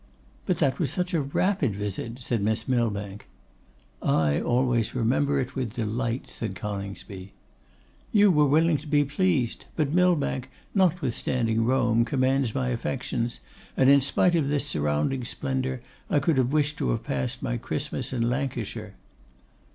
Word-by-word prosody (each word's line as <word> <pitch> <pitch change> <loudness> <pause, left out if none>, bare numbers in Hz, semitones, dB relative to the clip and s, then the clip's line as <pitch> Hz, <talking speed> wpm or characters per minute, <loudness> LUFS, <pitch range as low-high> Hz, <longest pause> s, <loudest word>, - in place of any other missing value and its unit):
'But 180 -4 +1
that 140 -5 +1
was 155 -7 +1
such 180 +5 -2
a 165 - +2
rapid 140 - 0
visit,' 105 +3 -4
said 120 -2 -1
Miss 110 +2 0
Millbank. 105 -5 -1 0.7
'I 75 -2 +2
always 120 -2 +1
remember 135 +4 +1
it 130 -1 -3
with 125 -5 -3
delight,' 120 +2 -2
said 105 -4 -4
Coningsby. 100 0 -6 0.8
'You 205 -2 +5
were 150 -3 +4
willing 160 +2 +3
to 150 +3 -11
be 145 0 +3
pleased; 145 -4 0
but 150 -2 0
Millbank, 165 -7 +2 0.2
notwithstanding 125 - +1
Rome, 120 -2 +3
commands 130 -2 +1
my 130 -1 0
affections, 120 -1 -2 0.4
and 135 0 +6
in 140 0 +6
spite 175 +6 +2
of 160 -5 +2
this 145 -1 +1
surrounding 75 - 0
splendour, 130 +1 -2 0.3
I - - +2
could 145 +1 +2
have 125 0 +1
wished 150 0 +1
to - - 0
have - - -1
passed 65 -2 -3
my - - -1
Christmas - - -3
in 120 -3 0
Lancashire. 120 -5 -3
130 Hz, 150 wpm, -26 LUFS, 115-145 Hz, 0.8 s, and